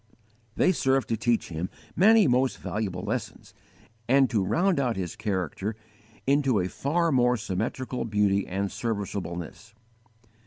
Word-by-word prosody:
They - - +4
serve 135 -6 +1
to 115 - -1
teach 115 +1 0
him 85 +2 -4 0.3
many 215 +4 +6
most 130 +1 +2
valuable 95 -4 -3
lessons, - - -5 0.6
and 135 -1 +4
to 105 -5 +2
round 175 - +2
out 125 -4 0
his 90 -3 -4
character 100 0 -3 0.5
into 135 -5 +3
a 90 0 -1
far 165 - 0
more 125 -2 +3
symmetrical 120 +6 -3
beauty 105 -2 +1
and 100 +1 -2
serviceableness. 100 -1 -5
115 Hz, 130 wpm, -27 LUFS, 100-135 Hz, 0.6 s, many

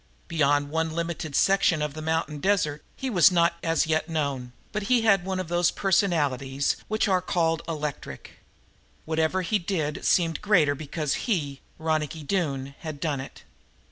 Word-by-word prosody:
Beyond 145 -3 +1
one 160 0 -1
limited 165 -3 -3
section 195 -4 +3
of 150 -1 -2
the 155 - -7
mountain 160 -1 -1
desert 155 -5 0
he 265 - -4
was 190 -6 +5
not 170 -1 +2
as 165 0 +1
yet 155 +1 0
known, 140 -6 -2 0.2
but 210 - -2
he 250 -2 +4
had 200 -5 +4
one 190 0 -2
of 185 - -3
those 175 +1 +2
personalities 145 -8 +1
which 215 +1 0
are 185 -2 +2
called 165 -3 0
electric. 150 - -6 0.7
Whatever 160 +4 0
he 210 +4 +1
did 165 -5 -2
seemed 165 -3 +2
greater 180 -9 +4
because 150 0 -3 0.2
he, 145 -10 -1 0.2
Ronicky 155 -1 -2
Doone, 140 -5 -2
had 155 -3 -6
done 150 -3 -1
it. 135 - -11
160 Hz, 160 wpm, -26 LUFS, 150-180 Hz, 0.7 s, was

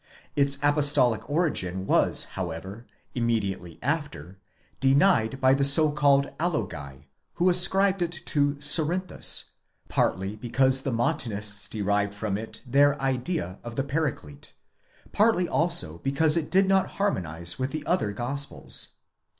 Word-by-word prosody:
Its 140 -1 +1
Apostolic 145 -6 +3
origin 95 - -1
was - - +2
however 95 +5 -6 0.3
(immediately 100 -8 -2
after) 140 - -4 0.4
denied 135 -3 +2
by 130 0 +4
the 140 +1 +1
so 150 +2 +5
called 140 -1 +2
Alogi, 75 - -4 0.3
who 180 +1 +2
ascribed 190 +2 +3
it 170 -1 -1
to 145 -4 -1
Cerinthus; 165 +5 +2 0.4
partly 95 +2 -1
because 130 +3 +2
the 135 - -3
Montanists 105 -3 -1
derived 100 -1 -1
from 105 -1 -3
it 110 +2 -7
their 140 +3 +3
idea 135 - -3
of 120 -1 -8
the 135 - -1
Paraclete; 135 - -4 0.6
partly 210 -4 +2
also 160 - 0
because 150 - +1
it 165 -3 -1
did 190 +1 +3
not 190 -1 +2
harmonize 85 - -2
with 130 +1 -1
the 155 +2 -6
other 175 - 0
Gospels.! 135 +6 -4
135 Hz, 125 wpm, -25 LUFS, 105-155 Hz, 0.6 s, so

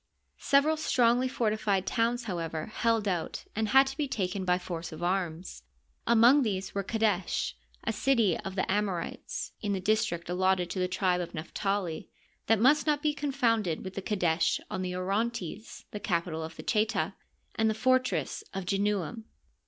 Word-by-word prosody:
Several 290 +3 +3
strongly 250 -4 +3
fortified 215 -5 0
towns, 235 +2 0
however, 165 -6 -3
held 225 -1 0
out 175 -4 -2
and 220 0 0
had 265 +5 +6
to 270 0 -5
be 290 0 -1
taken 190 -5 -2
by 180 0 +3
force 170 -2 -6
of 160 +2 -7
arms. 175 - -2 0.5
Among 235 +5 +6
these 195 -6 -2
were 200 - -1
Qadesh, 210 -4 0 0.3
a - - -1
city 230 -6 +2
of 190 -1 -6
the 190 - +1
Amorites 195 -3 -2
(in 205 -3 -1
the 195 - -1
district 200 -4 0
allotted 180 0 +1
to 190 - -3
the 180 - +1
tribe 180 -1 +1
of 175 - -6
Naphtali), 180 +1 -2 0.4
that 225 - +5
must 290 +7 +4
not 295 -1 +2
be 300 -1 +2
confounded 235 - 0
with 190 - -6
Qadesh 175 -6 +1
on 190 - -2
the 180 -1 -3
Orontes, 200 +1 -3
the 210 - -5
capital 170 -4 -1
of 160 +1 -6
the - - -9
Cheta, 215 -1 +1 0.4
and 220 0 +2
the 220 - 0
fortress 255 - +1
of 195 -1 -3
/enuam. 205 +2 -1
200 Hz, 165 wpm, -29 LUFS, 180-230 Hz, 0.5 s, had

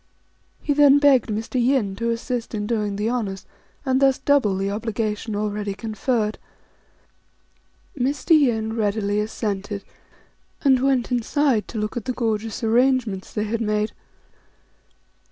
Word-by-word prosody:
He 290 - +1
then 285 -1 +6
begged 280 -5 +4
Mr. 225 +4 -1
Yin 240 -7 +1
to 230 +1 -1
assist 235 0 -3
in 205 -1 -2
doing 210 -3 -1
the 210 +2 -1
honours, 215 -6 -2 0.4
and 260 0 +2
thus 270 -1 +4
double 260 -10 +2
the 195 +1 -1
obligation 215 0 -3
already 205 -1 -2
conferred. 220 +1 -2 1.6
Mr. 270 +3 -2
Yin 230 -8 +3
readily 205 -1 0
assented, 205 -1 -3 0.8
and 265 -3 +4
went 265 -2 +1
inside 245 -2 +1
to - - -7
look 210 +2 -2
at 230 - -4
the 255 - -1
gorgeous 225 -1 -2
arrangements 235 -4 +1
they 210 - -2
had 225 +2 -2
made. 215 0 0
225 Hz, 135 wpm, -23 LUFS, 210-255 Hz, 1.6 s, then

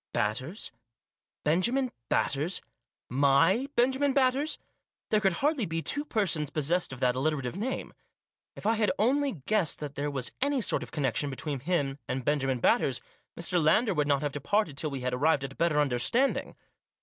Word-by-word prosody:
Batters? 125 - -2 0.7
Benjamin 235 - +2 0.2
Batters? 150 +7 +1 0.5
My 145 - +3
Benjamin 265 +3 +2
Batters? 275 +3 +2 0.5
There 215 - +4
could 195 -3 +2
hardly 295 -8 +1
be 165 0 -3
two 290 +1 +1
persons 180 - 0
possessed 160 +4 0
of 130 - -8
that 125 -1 +2
alliterative 135 -1 -1
name. 235 +7 -3 0.6
If - - -11
I 220 - +4
had 215 -1 +2
only 260 - +1
guessed 210 -7 +1
that 145 -2 -6
there 145 +1 -2
was 135 -4 -2
any 285 0 +2
sort 225 - 0
of - - -7
connection 145 0 -1
between 140 +1 -4
him 140 -2 -1
and 130 -1 -3
Benjamin 135 -3 +1
Batters, 125 +1 +2 0.4
Mr. 170 0 +1
Lander 210 +7 +3
would 150 -3 0
not 140 0 +2
have 145 - -1
departed 155 +4 0
till 155 +2 -1
we 135 -2 -5
had 125 0 -2
arrived 145 +2 +2
at 135 0 -5
a - - -20
better 165 -3 +2
understanding. 145 - +1
155 Hz, 170 wpm, -29 LUFS, 140-220 Hz, 0.7 s, There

